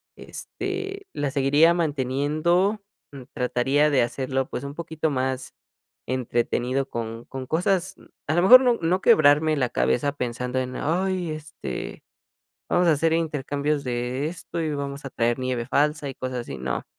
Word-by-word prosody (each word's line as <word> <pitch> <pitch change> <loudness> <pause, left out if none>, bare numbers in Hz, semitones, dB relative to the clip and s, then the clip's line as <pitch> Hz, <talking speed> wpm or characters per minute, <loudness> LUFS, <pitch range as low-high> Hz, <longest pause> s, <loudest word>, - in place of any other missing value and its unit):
este, 390 +1 -6
la 145 -1 -1
seguiría 145 +4 +4
manteniendo, 155 - +1 0.3
mm, 140 -2 -9
trataría 135 +3 +2
de 140 - +4
hacerlo, 130 +2 -1
pues 125 - -5
un 140 0 -6
poquito 160 -1 -3
más 130 -1 -2 0.5
entretenido 125 +1 -1
con 115 0 -5
con 135 -1 -7
cosas, 180 +5 0
mm, - - -18 0.2
a 155 - 0
lo 175 - +3
mejor 250 +7 +10
no 245 -3 +2
no 175 +3 +1
quebrarme 155 -6 +5
la 130 -4 0
cabeza 65 - +1
pensando 125 -1 -3
en: 130 0 -3
"Ay, 180 +1 -1
este, 150 - -7 0.7
vamos 175 0 +3
a 165 - +6
hacer 160 +2 +1
intercambios 150 -2 -1
de 125 +2 -2
esto, 170 0 -5
y 155 -2 -1
vamos 140 0 -5
a 135 - -6
traer 120 -1 0
nieve 130 -2 -2
falsa 150 +2 +1
y 135 - -7
cosas 130 -1 -4
así", 120 - -6
no. 65 -1 -3
145 Hz, 160 wpm, -24 LUFS, 130-165 Hz, 0.7 s, mejor